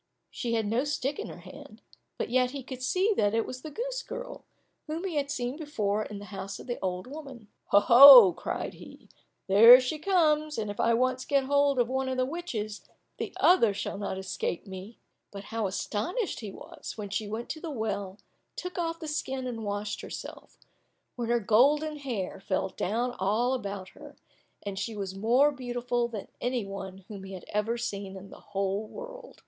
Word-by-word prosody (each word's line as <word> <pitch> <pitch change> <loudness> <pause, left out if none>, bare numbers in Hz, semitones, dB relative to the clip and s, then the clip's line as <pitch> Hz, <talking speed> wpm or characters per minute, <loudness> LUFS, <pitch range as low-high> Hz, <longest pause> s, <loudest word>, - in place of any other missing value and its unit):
She 235 -2 -3
had 220 -1 0
no 230 +5 +1
stick 290 -1 -2
in - - -4
her - - -10
hand, - - -13 0.3
but - - -3
yet 250 0 +3
he 275 0 -6
could 260 0 -8
see 375 +11 +2
that 205 +1 +2
it 225 - +1
was 255 0 -7
the 310 - -7
goose - - -4
girl, - - -7 0.4
whom 320 +3 -4
he 380 -3 -3
had 285 -2 -1
seen 250 +1 -3
before 215 -10 -1
in 205 - -7
the 205 - -9
house 195 0 -6
of - - -10
the 240 -1 -4
old 185 -1 -2
woman. 265 -6 -10 0.2
"Oho," 240 0 +10
cried - - -4
he, - - -14 0.4
"there 230 +6 +9
she 260 +5 -3
comes, 310 -4 +2
and 210 -2 -2
if 205 - -10
I 230 - +3
once 255 +1 +1
get 275 -1 +2
hold 280 0 +2
of 240 -1 +3
one 265 +1 -1
of 260 - -2
the 255 - +2
witches, 255 -10 -4 0.4
the - - -3
other 235 - +5
shall 200 - -4
not 200 -2 -3
escape 190 -1 -3
me!" 190 +3 -9 0.3
But 200 -1 -9
how 225 -2 -2
astonished 225 - -2
he 210 -4 -6
was, - - -9
when 205 -2 -6
she 210 0 -2
went 220 +3 -5
to 315 - -5
the 335 - -5
well, 205 -7 -3 0.4
took 360 0 -5
off 330 -1 -2
the 320 - -6
skin 265 -3 -3
and 230 -3 -4
washed 205 0 -3
herself, - - -9 0.6
when 235 -2 -3
her 240 0 +3
golden 285 +8 +3
hair 230 -10 -4
fell 190 0 -1
down 235 +7 -1
all 220 +7 +1
about 200 -6 -4
her, - - -13 0.5
and 200 -1 -4
she 225 +1 -3
was 195 -2 -4
more 240 +9 +3
beautiful 245 -2 -2
than 220 -4 -7
any 245 -3 -1
one 195 -1 -8
whom 200 -3 -8
he 195 0 -8
had 185 - -9
ever 215 +3 -1
seen 200 -4 -4
in 195 +1 -11
the - - -12
whole 200 +1 -2
world. - - -10
235 Hz, 195 wpm, -28 LUFS, 205-280 Hz, 0.6 s, Oho